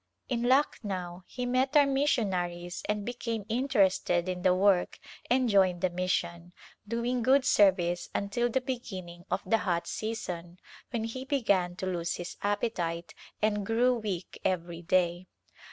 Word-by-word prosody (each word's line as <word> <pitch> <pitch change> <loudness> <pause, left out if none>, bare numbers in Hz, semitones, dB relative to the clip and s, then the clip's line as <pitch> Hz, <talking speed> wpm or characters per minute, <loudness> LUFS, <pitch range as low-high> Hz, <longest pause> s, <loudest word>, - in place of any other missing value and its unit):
In 240 -3 0
Lucknow 195 -9 0
he 250 -1 -4
met 260 +4 +2
our 290 - +7
missionaries 190 -11 0
and 210 -1 -1
be 245 - -3
came 230 -4 -4
interested 200 -8 +2
in 180 -1 -3
the 180 0 +4
work 190 -1 +3 0.3
and 255 0 +3
joined 190 -4 +3
the 185 -2 +1
mission, 175 -1 -2 0.3
doing 235 +2 -1
good 260 +2 +4
service 180 -6 +3
until 220 +5 0
the 260 +3 0
beginning 185 -9 -6
of - - -1
the 225 - +2
hot 175 -3 -1
season 180 -6 -5 0.3
when 235 -3 -2
he 230 +3 -4
began 200 -10 +1
to 185 - -4
lose 175 -2 -1
his 175 - -6
appetite 200 -5 -2 0.3
and 210 -1 +2
grew 235 +5 +3
weak 200 -6 -5
every 170 -2 -1
day. 175 +1 +1
200 Hz, 150 wpm, -29 LUFS, 175-240 Hz, 0.3 s, our